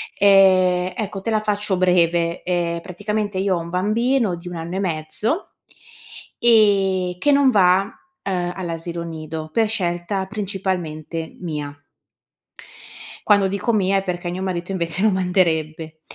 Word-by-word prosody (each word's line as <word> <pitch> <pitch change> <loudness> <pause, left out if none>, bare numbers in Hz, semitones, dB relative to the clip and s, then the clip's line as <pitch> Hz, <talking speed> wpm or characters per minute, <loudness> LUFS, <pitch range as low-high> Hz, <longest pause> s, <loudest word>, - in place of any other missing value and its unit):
Ehm, 185 -2 +4
ecco, 200 -2 -4
te 225 - -2
la 215 - +2
faccio 205 -2 -1
breve: 170 -2 +2
ehm, 170 -2 -1
praticamente 205 +2 -3
io 190 -1 +1
ho - - -2
un 170 0 -7
bambino 215 +2 +1
di 170 +1 -11
1 175 - -6
anno 165 +2 -5
e 190 - -1
mezzo 185 - -2 1.0
ehm, 195 -5 +3
che 290 - +3
non 280 -2 +5
va, 190 0 +4 0.3
uhm, 180 -2 -2
all'asilo 170 -1 -5
nido, 155 -1 -6
per 225 -2 +2
scelta 190 -1 -2
principalmente 180 -6 -4
mia. 150 -5 -5 1.5
Quando 200 -2 +4
dico 200 +4 -1
mia 195 -3 +2
è 195 - -1
perché 175 -2 -3
mio 180 +2 -4
marito 180 -1 -3
invece 170 -1 -2
lo 220 - +5
manderebbe. 160 -4 0
185 Hz, 140 wpm, -21 LUFS, 170-200 Hz, 1.5 s, non